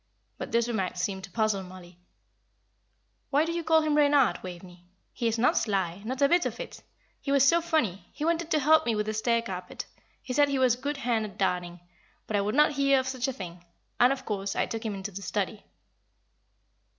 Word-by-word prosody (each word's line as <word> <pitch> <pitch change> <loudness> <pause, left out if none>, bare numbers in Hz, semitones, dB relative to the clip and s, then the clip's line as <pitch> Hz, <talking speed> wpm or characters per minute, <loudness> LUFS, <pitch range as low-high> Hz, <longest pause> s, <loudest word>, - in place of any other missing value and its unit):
But - - -5
this 235 0 +2
remark 195 -7 -2
seemed 190 +1 -2
to - - -18
puzzle 215 -1 0
Mollie. 180 -1 -12 1.3
"Why 295 +3 +3
do 335 - -2
you 340 0 -2
call 320 0 +4
him 305 -1 +1
Reynard, 285 -4 +4
Waveney? 180 -1 -10 0.3
He 235 - -1
is 225 0 0
not 240 +3 +3
sly, 195 -4 0
not 260 +5 -2
a - - +7
bit 350 +3 +3
of - - -7
it. - - -8 0.4
He 280 - -3
was 275 -1 +5
so 340 +4 +4
funny. 280 - -1
He 300 - -4
wanted 335 0 0
to 315 - +2
help 315 +1 +4
me 230 - +2
with 210 0 -1
the 215 - -2
stair 230 +1 +1
carpet 185 -4 -6 0.4
he 255 - -4
said 290 +1 +4
he 280 - 0
was 255 -2 +4
a 245 - -7
good 290 +1 -2
hand 235 -4 0
at 205 - -10
darning; 180 -2 -1 0.4
but 215 - -3
I 200 - +3
would 210 +4 -1
not 300 +1 +5
hear 275 -1 +3
of 260 - -3
such 260 0 -2
a - - 0
thing, 175 -6 -9 0.4
and, 245 +2 +6
of 275 -1 -3
course, 200 -2 -3
I - - +1
took 225 -1 -5
him 215 -3 -3
into 195 +1 -6
the 200 +1 -7
study." 200 +2 -3
230 Hz, 225 wpm, -28 LUFS, 195-280 Hz, 1.3 s, a